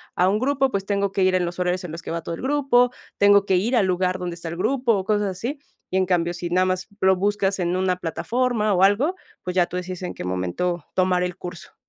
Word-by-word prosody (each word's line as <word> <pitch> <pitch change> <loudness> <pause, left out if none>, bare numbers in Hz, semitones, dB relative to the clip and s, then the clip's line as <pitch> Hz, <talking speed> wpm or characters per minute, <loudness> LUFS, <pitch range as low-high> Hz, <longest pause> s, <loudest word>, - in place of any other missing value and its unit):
a 180 +1 +3
un 205 +2 +1
grupo, 270 +1 +1
pues, 195 -1 -2
tengo 200 -1 0
que 195 - +1
ir 185 - +3
en 180 - +2
los 175 0 -5
horarios 180 0 0
en 175 - -6
los 165 - -6
que - - -6
va 170 - -2
todo 170 - -4
el - - -10
grupo, 265 -3 +3 0.3
tengo 200 0 +5
que 190 -2 +3
ir 225 +8 +1
al 205 -5 +3
lugar 185 0 0
donde 175 -1 -4
está 170 0 -8
el 170 - -6
grupo", 250 +4 +1
o 190 - -2
cosas 210 0 +1
así. 235 +10 -4 0.3
Y 185 - +1
en 190 - +3
cambio, 175 -1 +1
si 175 0 -5
nada 185 +1 +3
más 185 0 -1
lo 190 0 +5
buscas 200 0 0
en 175 0 0
una 185 -1 +1
plataforma, 215 +5 0
o 185 - +3
algo, 235 - +3 0.3
pues, 180 0 -4
ya 180 -2 +4
tú - - -8
decides 180 0 -5
en 180 - -4
qué - - -6
momento 95 - -2
tomar 185 -1 +2
el 180 -1 -3
curso. 175 -1 -9
185 Hz, 260 wpm, -23 LUFS, 180-205 Hz, 0.3 s, tengo